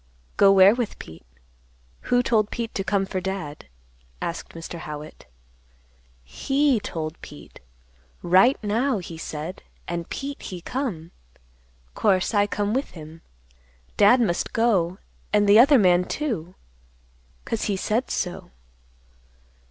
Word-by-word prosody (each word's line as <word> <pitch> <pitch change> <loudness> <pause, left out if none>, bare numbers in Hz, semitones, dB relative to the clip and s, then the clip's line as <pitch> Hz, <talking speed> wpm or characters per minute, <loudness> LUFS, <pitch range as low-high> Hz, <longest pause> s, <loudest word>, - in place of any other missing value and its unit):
"Go 200 -1 +6
where 195 +1 +7
with 240 -3 -3
Pete? 80 -6 -12 0.8
Who 245 0 +3
told 215 -4 +2
Pete 230 -1 -4
to 195 - -2
come 195 -1 0
for 190 -1 -4
Dad?" 180 - -5 0.5
asked 170 - -5
Mr. 165 +1 -7
Howitt. 150 - -9 1.0
"He 270 - +1
told 160 -5 -6
Pete. 145 - -13 0.6
Right 190 +10 +5
now, 230 +5 +1
he 175 -3 -7
said. 160 +2 -6 0.3
And 170 -1 -4
Pete 280 0 -5
he 180 - -7
come. 185 - -4 0.8
'Course 190 0 +1
I 205 -1 +3
come 205 0 -2
with 265 +3 -1
him. 160 +1 -11 0.7
Dad 210 +5 +6
must 190 -7 -1
go, 195 -6 +1 0.3
an' 210 0 +3
the 205 +2 +7
other 280 +3 +7
man 180 -4 +4
too, 190 - -4 0.9
'cause 225 - -2
he 200 -2 -1
said 220 +6 -1
so." 180 -1 -3
195 Hz, 130 wpm, -24 LUFS, 170-230 Hz, 1.0 s, where